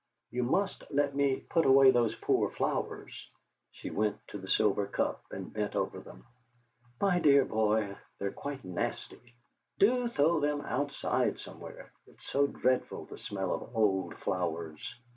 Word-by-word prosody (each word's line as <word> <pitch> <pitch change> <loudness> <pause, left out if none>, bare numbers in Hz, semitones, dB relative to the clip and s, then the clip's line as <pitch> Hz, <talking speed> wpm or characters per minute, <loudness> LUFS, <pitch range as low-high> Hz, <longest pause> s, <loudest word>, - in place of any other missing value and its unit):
You 125 +1 -1
must 195 +11 0
let 140 0 +1
me 140 -1 +2
put 165 - +1
away 135 0 +8
those 120 -3 +2
poor - - +1
flowers!" - - -3 0.4
She - - -8
went 105 0 0
to 105 - -6
the 95 - -9
silver 100 0 +2
cup - - -1
and 95 -1 -7
bent 105 -1 -2
over - - -1
them. - - -13 0.7
"My 195 -3 +3
dear 140 -4 +6
boy, 110 -2 +1 0.2
they're 100 0 -2
quite 140 -6 -6
nasty! 115 +6 -5 0.4
Do 245 +4 +4
throw 165 -6 +2
them 145 0 0
outside 145 +1 -1
somewhere; - - -10 0.2
it's - - -19
so 140 +1 +3
dreadful, 130 -2 0
the - - -11
smell 95 -2 -2
of 115 - -6
old 95 -4 +2
flowers!" 85 -5 -3
125 Hz, 150 wpm, -31 LUFS, 100-145 Hz, 0.7 s, away